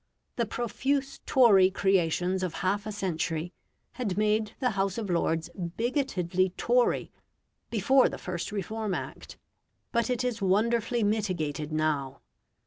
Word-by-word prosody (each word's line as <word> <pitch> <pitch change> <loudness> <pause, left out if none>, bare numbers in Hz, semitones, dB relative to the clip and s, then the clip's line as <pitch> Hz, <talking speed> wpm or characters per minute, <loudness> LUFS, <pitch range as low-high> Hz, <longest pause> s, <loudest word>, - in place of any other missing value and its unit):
The 235 -2 0
profuse 270 +5 -2
Tory 205 -8 +6
creations 185 -1 +1
of 180 -3 -3
half 200 +3 0
a - - -3
century 175 -3 -2 0.4
had 210 -7 -3
made 215 +1 +1
the 250 -2 +1
House 195 -1 -1
of 210 -5 -3
Lords 165 -1 0
bigotedly 185 - -1
Tory 245 +1 +2 0.6
before 250 +5 +4
the - - -6
first 175 0 -5
Reform 210 0 -3
Act, - - -7 0.5
but 235 0 +1
it 250 0 0
is 245 -3 -2
wonderfully 230 +4 +1
mitigated 175 -8 -1
now. 150 -4 -1
200 Hz, 130 wpm, -28 LUFS, 175-230 Hz, 0.6 s, Tory